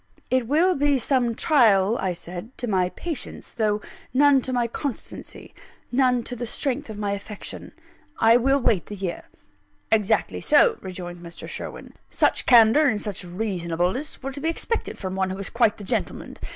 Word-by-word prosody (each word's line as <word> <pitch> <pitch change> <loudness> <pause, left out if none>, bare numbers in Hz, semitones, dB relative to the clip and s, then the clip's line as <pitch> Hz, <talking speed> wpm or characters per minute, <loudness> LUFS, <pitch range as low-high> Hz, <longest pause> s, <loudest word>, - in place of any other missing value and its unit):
"It 255 -3 +2
will 330 +7 +3
be 285 -2 +2
some 245 -2 +1
trial," 220 -8 +4
I 190 -2 0
said, 175 +7 -9
"to 245 - -3
my 185 -5 +1
patience, 325 - -6
though 210 -2 0 0.3
none 285 0 +5
to 255 - -5
my 245 -2 +1
constancy, 245 +2 -6 0.4
none 250 -1 +2
to 245 - -6
the 240 0 -4
strength 275 +2 -2
of 215 - -7
my 205 -1 -2
affection 200 +1 -7 0.5
I 225 +1 +6
will 270 +3 +2
wait 225 -8 +1
the 210 - -6
year." 190 -3 -4 0.7
"Exactly 215 -3 +1
so," 460 -3 +4
rejoined 175 -2 -7
Mr. 170 -1 -9
Sherwin; - - -7 0.2
"such - - +1
candour 240 +5 +7
and 215 -5 +1
such 205 -3 -5
reasonableness 180 - -2
were 270 - -3
to 280 - -7
be 320 - 0
expected 455 +7 -2
from 190 -2 -5
one 190 0 0
who 190 - -4
is 195 - -6
quite 235 -3 +2
the 205 - -9
gentleman. 190 - -3
225 Hz, 175 wpm, -24 LUFS, 190-265 Hz, 0.7 s, candour